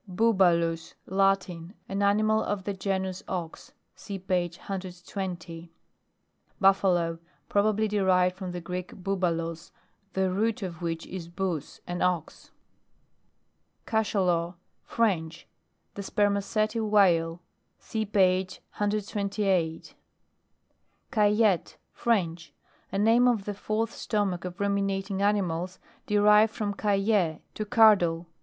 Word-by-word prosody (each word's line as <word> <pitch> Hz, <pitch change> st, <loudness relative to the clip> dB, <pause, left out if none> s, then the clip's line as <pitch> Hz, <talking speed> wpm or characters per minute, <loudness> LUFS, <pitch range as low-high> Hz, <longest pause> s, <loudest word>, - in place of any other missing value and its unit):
BUBALUS. 175 Hz, -5 st, +2 dB
Latin. 190 Hz, -2 st, 0 dB
An 195 Hz, +1 st, -2 dB
animal 215 Hz, +2 st, +3 dB
of 205 Hz, -2 st, -2 dB
the 200 Hz, -, -3 dB
genus 190 Hz, -1 st, -2 dB
ox. 175 Hz, -3 st, -5 dB, 0.2 s
(See 200 Hz, -, -7 dB
page 180 Hz, -2 st, -1 dB
120.) 180 Hz, -3 st, -6 dB, 0.9 s
BUFFALO. 180 Hz, -4 st, +3 dB, 0.3 s
Probably 215 Hz, +1 st, +2 dB
derived 185 Hz, -3 st, +2 dB
from 185 Hz, -1 st, -6 dB
the 175 Hz, 0 st, -5 dB
Greek 180 Hz, +2 st, -5 dB
boubulos, 170 Hz, -4 st, -2 dB, 0.4 s
the 190 Hz, -1 st, +1 dB
root 220 Hz, +4 st, 0 dB
of 175 Hz, -3 st, -6 dB
which 165 Hz, -1 st, -3 dB
is 180 Hz, -3 st, -7 dB
bous, 175 Hz, -4 st, -4 dB
an 175 Hz, 0 st, -4 dB
ox. 180 Hz, -4 st, -1 dB, 1.4 s
CACHALOT. 180 Hz, -6 st, 0 dB, 0.3 s
French. 170 Hz, -7 st, -1 dB, 0.5 s
The 200 Hz, -, -6 dB
spermaceti 205 Hz, +2 st, 0 dB
whale. 180 Hz, -6 st, +3 dB, 0.4 s
(See 220 Hz, -1 st, -3 dB
page 190 Hz, -2 st, +1 dB, 0.2 s
128.) 200 Hz, -4 st, -1 dB, 1.2 s
CAILLETTE. 210 Hz, -4 st, +2 dB, 0.2 s
French. 170 Hz, -9 st, -1 dB, 0.4 s
A 195 Hz, -, -2 dB
name 225 Hz, +4 st, +4 dB
of 225 Hz, -5 st, +1 dB
the 205 Hz, -, -3 dB
fourth 215 Hz, +3 st, -2 dB
stomach 195 Hz, -5 st, -1 dB
of 180 Hz, +2 st, -7 dB
Ruminating 195 Hz, -1 st, -1 dB
ani 205 Hz, 0 st, +3 dB
mals, 180 Hz, +1 st, -3 dB, 0.3 s
derived 210 Hz, +1 st, +5 dB
from 210 Hz, -2 st, -3 dB
cailler, 195 Hz, -5 st, +1 dB
to 215 Hz, -, -4 dB
cur 220 Hz, -1 st, +7 dB
dle. 170 Hz, -2 st, -2 dB
195 Hz, 110 wpm, -27 LUFS, 175-210 Hz, 1.4 s, cur